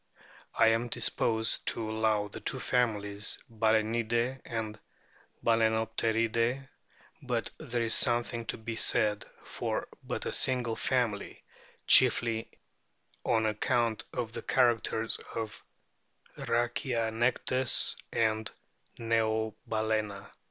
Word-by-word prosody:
I 115 - +5
am 115 +2 +1
disposed 110 -1 0
to 115 - -1
allow 110 -1 +1
the - - -7
two - - -4
families 105 -4 -1
Balsenidae 115 +3 0
and 110 -2 -4 0.7
Balsenopteridae; 115 +2 +1 0.5
but - - -2
there 120 0 -2
is 115 - +1
something 120 -1 +2
to - - -3
be 115 0 -5
said 105 -3 +2 0.2
for - - -3 0.2
but - - -4
a - - -2
single 125 -3 +2
family, 120 -6 -1 0.4
chiefly 115 -1 +5 0.7
on 110 -2 +2
account 110 +1 0
of 115 -2 -4
the - - -4
characters 115 -3 +1 0.2
of 110 -2 -5 0.7
Rhachianectes 120 +1 0 0.2
and 110 -1 0 0.5
Neobalcena. 110 -2 -1
115 Hz, 95 wpm, -30 LUFS, 110-120 Hz, 0.7 s, I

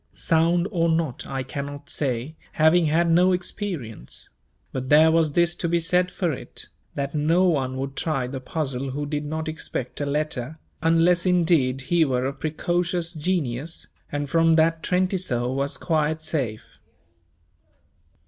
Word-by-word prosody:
Sound 170 +2 +2
or 170 -4 +1
not, 160 -6 -1
I 135 -1 -3
cannot 140 +2 -6
say, 135 +2 -2 0.2
having 160 +2 +4
had 165 +3 +2
no 180 +2 +5
experience; 175 - -4 0.4
but 130 0 -4
there 155 +2 +7
was 160 -2 +2
this 170 +1 +3
to 175 -1 -3
be 170 0 +2
said 180 +2 +2
for 175 -3 -1
it, 135 - -8 0.3
that 140 0 -3
no 160 +4 +2
one 135 -7 +1
would 135 +1 -4
try 145 -6 -1
the 130 +2 -5
puzzle 135 -1 -3
who 145 +3 -3
did 145 0 -3
not 160 +2 -3
expect 150 -4 -4
a 145 - -1
letter, 150 -1 -2 0.2
unless 165 +2 +3
indeed 165 -8 +2
he 170 +5 +2
were 130 -3 0
of 135 +1 -4
precocious 175 +2 -1
genius, 155 -3 -2 0.3
and 145 0 -2
from 165 +2 +4
that 165 0 +3
Trentisoe 180 -11 0
was 140 +1 -1
quite 160 -1 0
safe. 135 -9 -2
155 Hz, 150 wpm, -24 LUFS, 135-170 Hz, 0.4 s, there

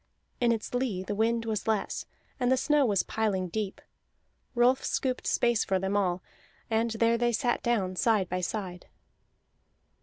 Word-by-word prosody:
In 240 -1 +3
its 225 0 -3
lee 245 -7 -1
the 200 - -3
wind 230 +2 +1
was 220 -1 -2
less, 220 -2 -1 0.3
and 250 0 +2
the 260 - +4
snow 295 -1 +3
was 200 -3 +2
piling 195 -5 -1
deep; 205 +1 -3 0.8
Rolf 245 +2 +4
scooped 255 -2 -1
space 235 -2 +2
for 190 - +1
them 195 +2 -1
all, 185 -3 0 0.5
and 225 +1 +2
there 230 +1 +2
they 240 0 +2
sat 240 +2 0
down 200 -6 0
side 210 -2 +2
by 180 +1 -2
side. 180 -2 -4
220 Hz, 160 wpm, -29 LUFS, 195-240 Hz, 0.8 s, the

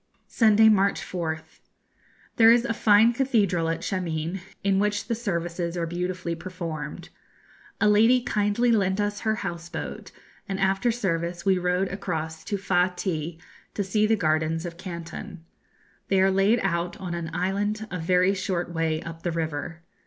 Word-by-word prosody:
Sunday, 220 -1 +5
March 200 -2 +3
4th. 160 -3 -5 0.8
There 225 0 +8
is 235 +1 +4
a 230 - 0
fine 215 +2 +5
cathedral 205 -10 +1
at 165 - -2
Shameen, 170 -1 -2 0.2
in 195 -1 +2
which 205 0 0
the 235 - -1
services 175 -5 -3
are 170 - 0
beautifully 175 +1 -3
performed. 165 -3 -6 0.7
A - - +3
lady 225 +4 +5
kindly 225 0 +1
lent 195 -3 +2
us 205 0 -1
her 220 -1 0
house 170 0 -5
boat, 170 - -6 0.4
and 195 0 -2
after 195 +5 +2
service 170 -6 -2
we 190 -2 +3
rowed 180 +2 0
across 160 -5 -4
to 205 - -2
Fa 180 -2 +2
ti, 160 -3 -3 0.4
to 205 - 0
see 210 +2 +1
the 225 - +3
gardens 160 -2 0
of 170 -1 -6
Canton. 170 -1 -8 0.6
They 195 - +2
are 190 0 +4
laid 195 +5 +3
out 175 -2 -1
on 180 -2 -5
an 170 -1 -4
island 205 +5 -1
a 180 - -3
very 180 +3 +3
short 180 -3 -2
way 160 -1 -1
up 165 -1 -8
the 175 - -2
river. 160 0 -4
185 Hz, 160 wpm, -25 LUFS, 170-205 Hz, 0.8 s, There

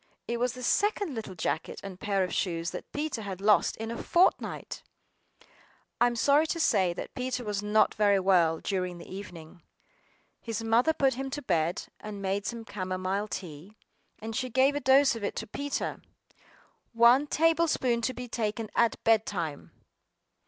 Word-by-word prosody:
It 235 - -1
was 245 0 0
the 255 - -9
second 405 - +1
little 220 -5 -6
jacket - - -3
and 190 -2 -8
pair 200 -2 0
of 180 - -3
shoes 170 -2 -1
that - - -8
Peter 295 -5 -3
had 195 -3 -6
lost 210 +1 +3
in 225 +1 -5
a 235 - -5
fortnight! 355 +2 +1 1.2
I 240 - +5
AM 240 - -2
sorry 285 +6 +3
to 335 - -2
say 185 - +3
that 175 - -7
Peter 255 0 -3
was 205 -2 -2
not 210 +1 +3
very 205 -2 +3
well 175 -4 +3
during 180 -3 -2
the 170 - -11
evening. 175 -3 -10 0.8
His 225 -1 -4
mother 230 +7 +3
put 275 -4 +2
him 270 +2 -4
to 290 +2 -5
bed, 170 -5 0 0.2
and 210 -1 -7
made 195 0 -2
some 235 -1 -5
camomile 185 +1 -3
tea; 185 +1 -8 0.4
and 220 0 -6
she 255 +2 -2
gave 265 +3 +3
a 290 - -1
dose 270 -1 +4
of 225 - -7
it 200 - -2
to 225 - -4
Peter! 280 +6 -4 0.9
"One 240 +5 +5
table 330 +2 +3
spoonful 240 -6 +1
to 260 - -3
be 250 0 -6
taken 220 -1 -3
at 235 -1 +2
bed 225 -1 +3
time." 165 -7 -4
220 Hz, 175 wpm, -28 LUFS, 190-255 Hz, 1.2 s, I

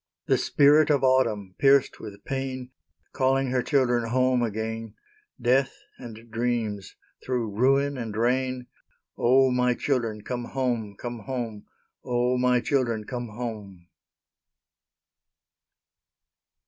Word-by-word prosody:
The - - +2
Spirit 150 +2 +4
of 140 -3 +2
Autumn, 110 -8 +2
pierced 140 -1 +4
with 100 -2 -10
pain, 130 -2 -4 0.4
Calling 135 0 +1
her 125 -1 +1
children 125 -5 +1
home 130 0 +2
again, 110 0 -4 0.4
Death 130 +2 +2 0.2
and 115 -2 -11
Dreams, 115 -4 -2 0.3
through 120 -4 -2
ruin 135 +3 +2
and 110 -3 -5
rain, 130 +2 0 0.5
"O, 130 +2 +4
my 125 0 +2
children, 115 -7 -2
come 120 -1 -4
home, 120 -6 -2
come 120 -1 -6
home! 115 -5 -5 0.4
O, 125 +1 0
my 125 -1 +3
children, 120 -5 0
come 120 +1 -5
home!" 105 -6 -7
125 Hz, 110 wpm, -26 LUFS, 115-130 Hz, 0.5 s, Spirit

